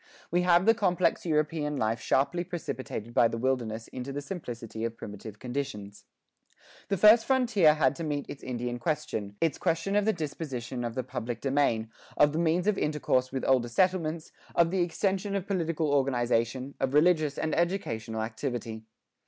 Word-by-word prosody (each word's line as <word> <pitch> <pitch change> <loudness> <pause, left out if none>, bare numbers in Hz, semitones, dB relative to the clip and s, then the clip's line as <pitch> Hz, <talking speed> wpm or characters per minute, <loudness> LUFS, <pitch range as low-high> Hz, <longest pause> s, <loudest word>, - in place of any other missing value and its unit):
We 175 +1 +3
have 175 0 +4
the 225 - +7
complex 180 -5 +1
European 150 -1 0
life 110 -1 0
sharply 170 +9 +1
precipitated 140 - -5
by 120 - +5
the 115 - -4
wilderness 115 -3 -1
into 130 +1 -6
the 140 - -3
simplicity 120 - -6
of 115 0 -3
primitive 105 +1 -8
conditions. 105 -6 -5 0.8
The 200 - 0
first 215 +4 +7
frontier 230 - +4
had 140 -3 +2
to 165 - -4
meet 145 -2 -2
its 140 - -8
Indian 120 -1 -4
question, 115 -9 -3
its 165 -4 0
question 165 +5 0
of 205 -1 +3
the 220 - +4
disposition 135 -6 -4
of 115 -1 -4
the 130 - -1
public 120 -2 -5
domain, 130 -5 +1 0.3
of 145 0 +5
the 160 - -1
means 170 +2 +2
of 210 -1 +1
intercourse 135 -4 0
with 130 -1 -3
older 125 -3 +3
settlements, 170 +1 0 0.2
of 170 0 +4
the 190 -1 +1
extension 195 +3 -1
of 195 -2 -2
political 165 -6 -1
organization, 130 -1 +1
of 135 +1 0
religious 155 -2 +3
and 160 - -1
educational 115 - -1
activity. 110 -1 -4
145 Hz, 170 wpm, -28 LUFS, 120-170 Hz, 0.8 s, the